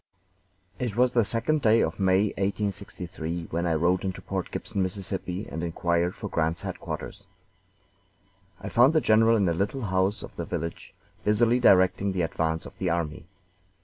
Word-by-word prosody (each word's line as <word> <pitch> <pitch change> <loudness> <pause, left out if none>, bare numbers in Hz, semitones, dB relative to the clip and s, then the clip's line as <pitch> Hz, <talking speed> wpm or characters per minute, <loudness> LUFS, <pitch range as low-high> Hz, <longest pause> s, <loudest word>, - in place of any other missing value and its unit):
It 120 -5 -2
was 125 +1 +3
the 120 - +4
second 120 +9 0
day 110 -1 +4
of - - -1
May, 95 +2 +3
1863, 95 -5 -4
when 85 +2 -1
I 80 - +1
rode 90 +3 +2
into 95 -2 -3
Port - - -4
Gibson, 100 - -3
Miss., 95 +1 -2
and 90 -2 -5
inquired 85 +1 0
for 105 - -6
Grant's 85 -2 -1
headquarters. - - -6 1.3
I - - -7
found 125 +6 +5
the 160 - +5
general 115 -2 +4
in 100 -3 +2
a 85 - +2
little 100 +9 -2
house 95 +1 0
of - - -10
the - - -3
village, 85 +1 -5 0.3
busily 115 +3 +3
directing 95 -2 +4
the 90 -2 0
advance 80 0 -1
of - - -11
the 95 - 0
army. 80 -2 -2
95 Hz, 165 wpm, -26 LUFS, 85-110 Hz, 1.3 s, found